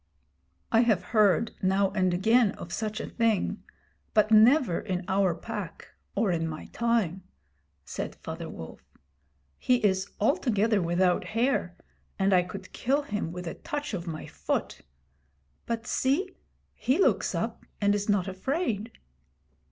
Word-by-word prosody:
'I 225 - +5
have 225 -5 +3
heard 215 0 +4
now 190 +1 +2
and 185 -2 +1
again 220 +5 +3
of 170 - -9
such 215 0 -3
a - - -3
thing, 225 -4 0 0.5
but 215 0 +4
never 225 - +5
in 185 -3 -3
our 190 -3 +2
Pack 205 0 -7 0.3
or 205 -2 +2
in 165 -1 0
my 155 -1 -6
time,' 225 -6 +1 0.6
said - - -5
Father - - -7
Wolf. 80 - -9 0.8
'He 250 - +3
is 190 -1 +1
altogether 215 -3 +2
without 175 +1 +2
hair, 230 -8 +1 0.4
and 195 0 +2
I 180 - +6
could 185 +1 -8
kill 275 +4 +1
him 205 - -3
with 180 +1 -6
a 165 - -4
touch 290 -3 -5
of 175 -3 -4
my 155 -2 -5
foot. - - -3 0.9
But 230 0 -2
see, 330 +11 0 0.4
he 260 +4 0
looks 390 - +2
up - - -3 0.2
and 205 -1 +3
is 205 0 -2
not 200 -2 +2
afraid.' 225 - -2
205 Hz, 145 wpm, -28 LUFS, 185-230 Hz, 0.9 s, I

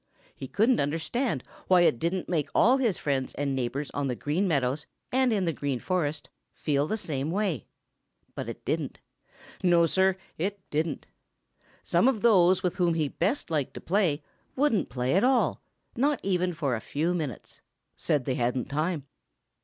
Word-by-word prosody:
He 135 - -7
couldn't 230 - +3
understand 160 - -1 0.2
why 180 -1 +6
it 145 -9 +3
didn't 175 +2 -1
make 160 -5 0
all 250 +4 +5
his 235 -9 +1
friends 135 -3 -2
and 140 0 -1
neighbors 130 +3 -2
on 145 -1 -2
the 125 - -1
Green 160 +10 0
Meadows 140 -2 0 0.2
and 260 -1 +3
in 200 -4 +1
the 165 - 0
Green 140 -3 -2
Forest 155 -4 -1 0.2
feel 145 -1 0
the 220 - -1
same 145 -7 -3
way. 180 - -1 0.7
But - - -5
it - - -8
didn't. - - -2 0.6
No, 175 -2 +5
Sir, 190 +3 +2 0.2
it 200 +4 -1
didn't. 155 +1 -1 0.8
Some 175 +8 +3
of 235 -6 +1
those 185 -5 +5
with 180 -1 -1
whom 175 -3 +2
he 155 -3 0
best 270 - -1
liked 150 -4 -1
to - - -5
play 165 -5 +1 0.3
wouldn't 265 -6 +2
play 125 +1 -1
at 190 - +3
all, 255 0 +2 0.3
not 280 +4 +2
even 180 -2 0
for 140 -6 0
a 110 - -5
few 160 +5 -1
minutes; 155 -9 -5 0.3
said 145 -4 0
they 130 - 0
hadn't 125 +1 -1
time. 155 +1 -1
165 Hz, 170 wpm, -28 LUFS, 145-195 Hz, 0.8 s, why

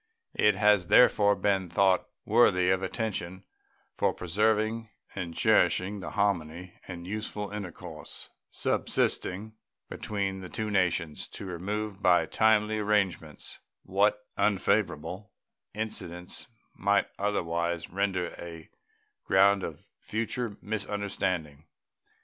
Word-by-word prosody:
It 105 -2 +4
has 105 -3 +4
therefore 105 -3 +6
been 95 -3 0
thought 95 +2 +3 0.2
worthy 95 -5 +4
of 95 0 +2
attention 95 -4 -3 0.5
for - - +1
preserving 110 +4 0 0.2
and 85 -4 -5
cherishing 100 +3 +3
the 95 - -5
harmony 90 -3 -1
and 85 -2 -7
useful 105 +1 -4
intercourse 100 -5 -8 0.2
subsisting 110 +4 0 0.3
between 100 -2 -3
the 90 - -8
two 110 -1 -3
nations 90 -5 0
to - - -8
remove 100 +3 -4
by 90 -4 +5
timely 110 +3 +3
arrangements 100 -7 -1 0.2
what 105 +2 +1
unfavorable 100 -1 0 0.4
incidents 90 -5 -4 0.3
might 100 0 +2
otherwise 85 -4 -1
render 95 -2 0
a 85 -2 -9 0.5
ground 100 +1 +5
of 80 -4 -6
future 115 0 -3
misunderstanding. 95 -7 -3
100 Hz, 105 wpm, -29 LUFS, 90-105 Hz, 0.5 s, therefore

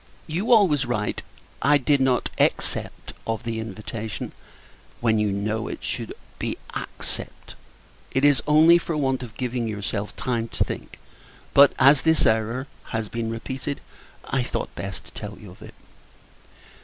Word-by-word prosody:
You 180 +9 -1
always 165 - +5
write 105 -3 -1 0.4
"I 145 +1 +5
did 140 0 +2
not 130 -2 +2
except - - 0
of 115 0 -2
the 115 -1 -2
invitation;" 110 0 -5 0.7
when, 110 -2 +2
you 105 -1 +2
know, 105 +3 -1
it - - -6
should - - -4 0.2
be - - -2 0.2
"accept." - - -6 0.6
It 135 +2 +2
is, 145 -5 +5
only, 160 +3 +7
for 165 -2 -3
want 135 -3 +1
of 115 -3 -9
giving 125 -2 -1
yourself 105 -1 -3
time 120 -3 -1
to - - 0
think; - - -6 0.6
but, 140 0 +8
as 135 +1 +7
this 160 0 +3
error 115 +4 +1 0.2
has 110 -2 -3
been 115 -1 -2
repeated, 130 +5 -4 0.5
I 135 - 0
thought 125 - -3
best 90 -1 -6
to 85 - -14
tell 105 +2 -7
you 105 -4 -11
of 90 - -17
it. - - -11
120 Hz, 155 wpm, -24 LUFS, 110-140 Hz, 0.7 s, but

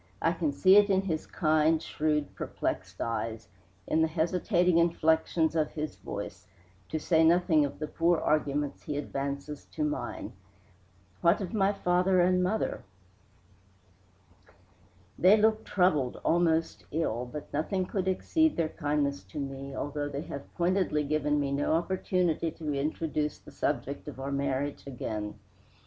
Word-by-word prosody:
I 165 - +2
can 160 -4 -1
see 190 +6 +6
it 205 0 +6
in 190 0 +3
his 160 -5 -3
kind, 155 -1 +2
shrewd, 150 -2 -1
perplexed - - -4
eyes, 115 0 -3 0.4
in 160 - +1
the 160 - +4
hesitating 175 +2 +2
inflections 160 -1 +2
of 155 -2 0
his 155 0 -4
voice, - - -7 0.4
to 155 - -2
say 160 +1 +3
nothing 165 -2 +4
of 140 - -6
the 155 - -3
poor 165 +2 +2
arguments 145 -2 0
he 150 -2 -4
advances 140 0 -4
to 155 - -4
mine. 150 0 -3 0.9
What 170 +3 +4
of 195 +1 -5
my 200 -2 +3
father 185 -1 +2
and 180 +1 +4
mother?" 195 +5 -1 2.4
"They 190 +4 +7
look 220 +1 +3
troubled, 155 -9 +1
almost 165 -1 +2
ill, 125 -6 -1
but 150 - -8
nothing 185 +6 0
could 190 0 -2
exceed 315 - +2
their 165 -2 +1
kindness 145 -3 -1
to 150 - -7
me, 135 0 -5
although 145 0 -3
they 140 0 -4
have 140 -4 -8
pointedly 175 -3 +1
given 150 0 +1
me 140 -1 -1
no 145 +2 +1
opportunity 175 -1 0
to 155 -2 -4
introduce 150 +1 -1
the - - -15
subject - - -2
of 130 - -8
our 135 +1 -4
marriage 140 +1 -2
again. 110 -5 -4
155 Hz, 145 wpm, -29 LUFS, 145-180 Hz, 2.4 s, They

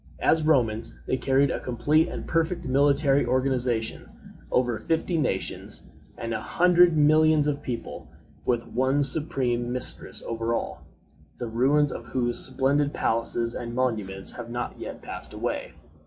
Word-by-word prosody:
As 160 - +3
Romans, 120 -8 +1
they - - 0
carried 135 +1 +2
a - - -2
complete 150 +6 +1
and - - -6
perfect 165 0 -1
military 140 +1 +3
organization 125 -2 -1 0.4
over 120 -3 +1
fifty 165 +2 -1
nations 135 -12 -2 0.3
and 115 0 -4
a 110 - -3
hundred 175 -1 +4
millions 155 0 +4
of 145 -1 -1
people, 115 - -6 0.4
with 120 -2 0
one 130 +4 +1
supreme 125 -4 0
mistress 125 0 -2
over 115 0 -1
all, - - -4 0.6
the 120 - -4
ruins 135 +5 +3
of 115 - -7
whose 120 -1 0
splendid 140 +2 +1
palaces 115 +1 0
and 120 -1 -5
monuments 105 -7 -1
have 120 -1 -8
not 120 +1 -5
yet - - -7
passed - - -6
away. - - -3
130 Hz, 140 wpm, -26 LUFS, 120-145 Hz, 0.6 s, hundred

